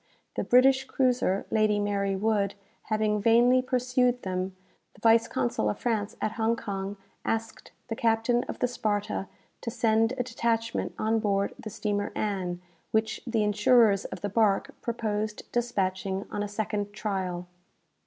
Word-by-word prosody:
The - - -1
British 265 +2 +5
cruiser 250 -7 +1
'Lady 215 -1 +3
Mary 200 -1 0
Wood,' 200 -1 +1 0.3
having 215 -1 +1
vainly 240 +4 +5
pursued 250 0 +1
them, 185 0 -3 0.4
the - - -18
vice 225 +1 +5
consul 120 -4 0
of 105 - -2
France 220 -3 -1
at 215 - -1
Hong 225 0 +1
Kong 200 -3 -4 0.3
asked 225 0 -3 0.2
the 225 - -3
captain 230 +2 +2
of - - -6
the 250 - +1
'Sparta,' 205 -4 -2 0.3
to - - -3
send 225 0 +2
a 250 - -1
detachment 230 -1 -1
on 220 +1 +1
board 200 -2 0
the 215 - -6
steamer 205 -1 -2
'Ann,' 185 -4 -2 0.3
which 220 0 0
the 225 -2 +1
insurers 210 0 +4
of - - -7
the 205 - -2
bark 205 -1 +2
proposed 215 -2 -2
despatching 195 -5 -1
on 205 - -2
a 205 - -1
second 205 0 -3
trial. 190 -4 -3
215 Hz, 150 wpm, -28 LUFS, 200-230 Hz, 0.4 s, British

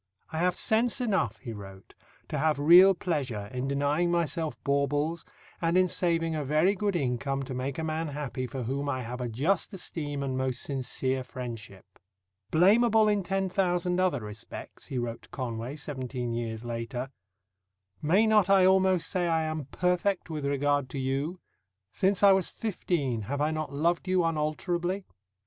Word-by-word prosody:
"I 160 - -3
have 180 +1 +2
sense 230 +5 +2
enough," 190 - 0
he 115 +2 -7
wrote, 95 -2 -11 0.4
"to 150 - -2
have 155 0 +2
real 175 +6 +8
pleasure 130 - -3
in 125 +1 -2
denying 145 +5 +1
myself 170 -2 0
baubles, 145 +4 0 0.4
and 170 +1 +2
in 185 0 +5
saving 165 -2 0
a 155 -2 -2
very 155 +7 +3
good 205 -1 -1
income 135 -1 -1
to 130 - -6
make 130 +2 -3
a 160 - -2
man 160 +1 -2
happy 140 -3 -4
for 130 -1 -5
whom 140 +4 -2
I 130 -2 -2
have 125 +2 -6
a 120 - -2
just 160 - 0
esteem 145 -6 -4
and 130 -1 -2
most 130 -1 -1
sincere 130 -1 -2
friendship." 120 -6 -8 0.6
"Blameable 215 - +5
in 205 -1 +2
ten 195 +1 -1
thousand 180 -1 0
other 180 -8 +1
respects," 105 +2 -9
he 130 - -4
wrote 120 -1 -3
to - - -18
Conway 120 0 -4
seventeen 130 -5 -4
years 115 -1 -4
later, 120 +2 -4 0.9
"may 185 +9 +4
not 210 -3 +4
I 195 -2 +6
almost 190 -3 +3
say 180 -1 0
I 165 -1 +2
am 155 -2 -3
perfect 180 +4 0
with 150 -3 -3
regard 145 -1 +1
to 140 - -6
you? 135 +7 -2 0.5
Since 195 +1 +1
I 200 - +9
was 190 -2 +2
fifteen 160 - -2
have 145 +1 -2
I 150 +1 +1
not 155 -2 -3
loved 170 +6 0
you 185 -1 +3
unalterably?" 170 +4 -1
150 Hz, 170 wpm, -28 LUFS, 130-180 Hz, 0.9 s, I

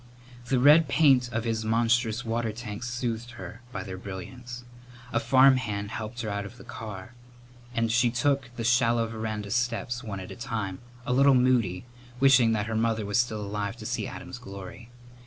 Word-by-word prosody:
The 130 +1 +2
red 150 +4 +7
paint 135 -4 +4
of 115 -1 -1
his 115 -1 -1
monstrous 115 +1 +1
water 115 0 -1
tanks 110 +1 -6
soothed 120 -1 -3
her 115 -1 -9
by - - -4
their 95 -2 -7
brilliance. 120 +6 -8 0.5
A 115 - +3
farmhand 120 -5 +3
helped 115 +2 -5
her 110 - -3
out 100 0 -2
of 110 +4 -10
the - - -12
car 105 0 -8 0.6
and 115 -2 +1
she 120 +1 +4
took 130 +2 0
the 115 - -4
shallow 120 -1 +3
veranda 110 -2 -4
steps 120 +1 -1
one 100 -4 -5
at 95 - -8
a - - -7
time, 110 -5 -4 0.3
a 125 - 0
little 135 +1 +6
moody, 120 -7 +2 0.3
wishing 130 -4 +6
that 105 -2 0
her 110 0 -3
mother 110 -1 +1
was 105 +4 +1
still 110 -3 0
alive 100 0 -3
to - - -9
see - - -2
Adam's - - -8
glory. 100 +4 -10
115 Hz, 180 wpm, -27 LUFS, 105-125 Hz, 0.6 s, red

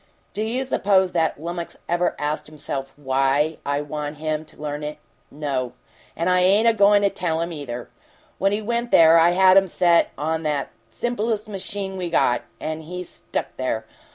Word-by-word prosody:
Do 210 - -3
you 235 +4 -1
suppose 195 -7 +2
that 165 -2 0
lummix 170 +1 -5
ever 175 +1 +1
asked 150 +1 -2
himself 140 -3 -5
WHY 135 +2 +1
I 145 0 -1
want 150 0 -5
him 155 0 -2
to - - -17
learn 150 0 -4
it? 150 0 -5 0.3
No! 135 -4 -3 0.4
And 170 - -1
I 180 0 +4
ain't 200 +5 +4
a 230 - +6
goin' 205 -1 +5
to 200 - +4
tell 170 -4 -1
him, 170 +1 -2
either! 125 -5 -6 0.5
When 195 +1 +2
he 210 +1 -1
went 235 +2 -1
there 165 -3 +7
I 170 +2 +5
had 190 +1 +6
'em 195 0 +5
set 170 -1 +3
him - - -23
on 160 +3 -1
the 150 -3 -1 0.2
simplest 220 - -2
machine 195 -1 -4
we 180 -2 -3
got 120 -7 +2 0.2
and 155 0 -4
he 180 +3 -6
stuck - - -5
there! 115 -4 -2
165 Hz, 185 wpm, -23 LUFS, 150-195 Hz, 0.5 s, there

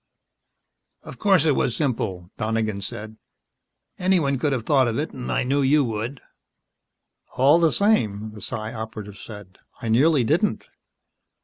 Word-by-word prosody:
"Of - - -11
course 190 -7 +4
it 150 -4 +3
was 120 - 0
simple," 105 - -2
Donegan 110 -2 -1
said. 110 +1 -6 0.8
"Anyone 170 -8 +2
could 145 +2 0
have 125 -4 -2
thought 135 -4 +3
of 115 - -1
it 150 +3 -2
and 125 -2 -6
I - - +1
knew 140 +3 +1
you 140 +2 +4
would." 115 +3 -4 1.2
"All 140 +6 +5
the 165 -2 +3
same," 110 - +1
the 105 -1 -11
Psi 110 +4 -4
Operative 110 -2 -7
said, 105 -4 -11 0.2
"I 115 - -4
nearly 135 +4 +4
didn't." 165 - 0
120 Hz, 145 wpm, -23 LUFS, 110-145 Hz, 1.2 s, All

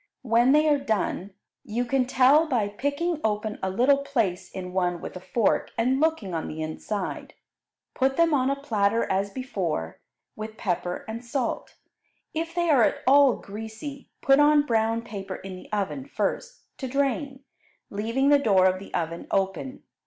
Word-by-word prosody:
When 240 +1 +4
they 305 +2 +5
are 295 -2 +4
done, 205 -6 -2 0.3
you 235 +4 -2
can 255 +1 +1
tell 270 +5 +5
by 230 -8 0
picking 285 +9 -2
open 215 0 -1
a 190 - -1
little 255 +8 +3
place 225 -10 -1
in 180 -1 -7
one 180 -2 0
with - - -8
a - - -5
fork 195 +4 0
and 255 +4 +2
looking 315 - 0
on 160 - -2
the 155 - -6
inside, 185 +5 -5 0.6
put 265 0 +1
them 335 -1 +4
on 265 -2 +2
a 275 - +1
platter 225 -5 +1
as 195 +1 0
before, 190 - -3 0.4
with 215 0 -7
pepper 180 -3 -2
and 225 +2 -6
salt. 245 0 -3 0.6
If 330 +1 -3
they 345 -1 +1
are 270 -5 +5
at - - +1
all 275 -1 +6
greasy, 220 +7 -8
put 275 0 +5
on 295 0 +5
brown 225 -2 +1
paper 195 -4 -6
in 190 -1 -8
the 185 - -13
oven 210 +6 -2
first, - - -3 0.2
to 265 - -3
drain, 275 +1 -1 0.5
leaving 230 +7 0
the 290 -1 +6
door 195 -8 +4
of 185 0 +2
the 195 - -11
oven 165 0 -3
open. 195 +8 -2
230 Hz, 170 wpm, -26 LUFS, 195-275 Hz, 0.6 s, all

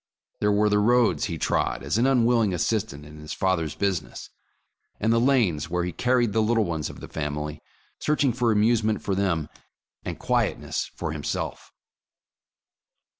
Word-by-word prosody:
There 105 - +2
were 105 +1 +3
the 105 0 +3
roads 120 +3 +3
he 85 -5 -4
trod - - 0
as 70 +11 0
an 125 - +3
unwilling 120 -5 +3
as 85 - 0
sistant 105 -10 -2
in 75 +1 -12
his 75 0 -7
father's 90 -5 0
business, 95 -5 -3 0.7
and 110 +2 +2
the 115 - +3
lanes 110 - +2
where 90 0 0
he 90 - -2
carried 120 +2 +1
the 110 - +3
little 110 +1 +2
ones 80 -4 -3
of - - -11
the - - -7
family, 75 0 -4 0.4
searching 145 -4 +1
for 120 -1 +1
amusement 110 0 +2
for 100 - -1
them, 90 -6 0 0.6
and - - -5
quietness - - -1
for - - -3
himself. - - -4
105 Hz, 165 wpm, -25 LUFS, 80-115 Hz, 0.7 s, were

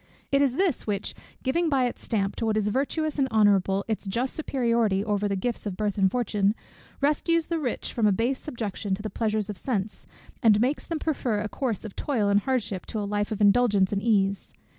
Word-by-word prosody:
It 275 0 +4
is 270 -3 +2
this 360 -8 0
which, 205 -1 -2 0.3
giving 330 +6 +1
by 270 -3 +2
its 245 - -4
stamp 200 -4 -1
to 225 - -1
what 215 -1 +1
is 210 -1 +1
virtuous 290 +5 -1
and 270 - +3
honourable 200 -3 +3
its 215 -2 -3
just 240 +7 -1
superiority 235 -9 +1
over 205 -1 0
the 200 - -1
gifts 220 +3 -2
of 185 -3 -4
birth 210 -2 -1
and 195 -2 +3
fortune, 210 -2 +1 0.5
rescues 315 +3 +2
the 335 -1 -2
rich 255 -6 -3
from 225 -3 +2
a - - +4
base 235 +7 0
subjection 210 -7 -3
to 205 - -9
the 215 - -4
pleasures 215 -2 -1
of 200 - -8
sense, 210 -5 -3 0.3
and 215 -4 +5
makes 255 +6 0
them 330 - -2
prefer 255 -9 -1
a 210 - -2
course 235 -6 -3
of 210 - -8
toil 225 -8 0
and 200 0 +4
hardship 225 -5 -2
to 220 - -3
a 205 - -2
life 205 +1 -1
of 215 - -3
indulgence 205 -2 +4
and 200 - 0
ease. 200 -3 +1
220 Hz, 215 wpm, -26 LUFS, 205-260 Hz, 0.5 s, and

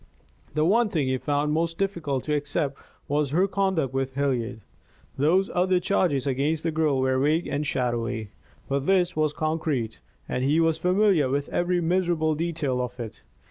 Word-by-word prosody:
The 155 0 +2
one 225 +5 +3
thing 155 -8 0
he 130 0 0
found 145 +2 0
most 165 +1 0
difficult 170 -9 -1
to 150 - -1
accept 145 -1 -1 0.3
was 145 0 +1
her 180 +7 +2
conduct 190 -9 0
with 135 0 -2
Hilliard. 125 -5 -1 0.5
Those 180 +8 +2
other 180 0 +2
charges 170 -8 +1
against 145 +4 0
the 165 - 0
girl 155 -4 +1
were 130 0 +1
vague 155 +5 +2
and 145 +1 -2
shadowy, 120 -4 -2 0.4
but 140 0 -1
this 185 -2 +3
was 155 -1 +1
concrete, 155 -7 -2 0.3
and 125 - -2
he 145 +4 +3
was 165 -1 +2
familiar 180 -6 +3
with 140 +2 -1
every 175 0 0
miserable 170 -2 +1
detail 155 -5 -1
of 125 0 -5
it. 115 -2 -7
150 Hz, 170 wpm, -25 LUFS, 135-170 Hz, 0.5 s, one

